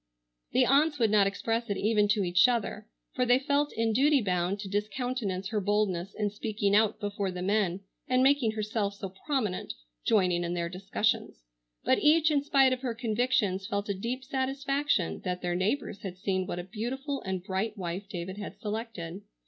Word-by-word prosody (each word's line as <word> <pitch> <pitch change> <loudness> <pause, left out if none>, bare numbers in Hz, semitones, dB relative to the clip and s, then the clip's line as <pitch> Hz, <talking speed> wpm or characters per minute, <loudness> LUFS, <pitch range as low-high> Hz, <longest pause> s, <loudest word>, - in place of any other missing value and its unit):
The 255 0 +4
aunts 295 +4 +3
would 225 -5 +2
not 205 -2 +5
express 225 +3 -2
it 200 - -1
even 210 0 +2
to 205 -1 +2
each 180 +2 +5
other,—for 235 +1 -3
they 245 0 +5
felt 285 +2 +1
in 225 0 0
duty 280 +4 +4
bound 185 -2 0
to 205 - -6
discountenance 210 -1 -2
her 215 -2 -1
boldness 200 -2 0
in 210 -1 -1
speaking 205 -1 0
out 215 0 +3
before 200 -1 -2
the 180 -1 -5
men 195 -2 +1 0.3
and 255 -1 +3
making 265 -5 +3
herself 215 -1 -2
so 200 -1 -6 0.2
prominent, 250 -11 -1 0.3
joining 180 -4 +2
in 175 0 -2
their 170 -1 -2
discussions,—but 185 - -2
each 310 +1 +4
in 285 -2 +3
spite 270 -2 +4
of 255 - -4
her 245 -3 -2
convictions 220 -4 0
felt 200 0 -2
a - - +2
deep 235 +7 -4
satisfaction 270 - 0
that 180 -1 -3
their 175 0 0
neighbors 200 +5 -1
had 185 -2 -6
seen 185 -1 -1
what - - -3
a 175 - -3
beautiful 265 - -4
and 190 -1 -3
bright 195 +4 -2
wife 185 +2 -4
David 185 +1 -5
had 205 - -7
selected. 210 -5 -5
210 Hz, 180 wpm, -29 LUFS, 190-250 Hz, 0.3 s, not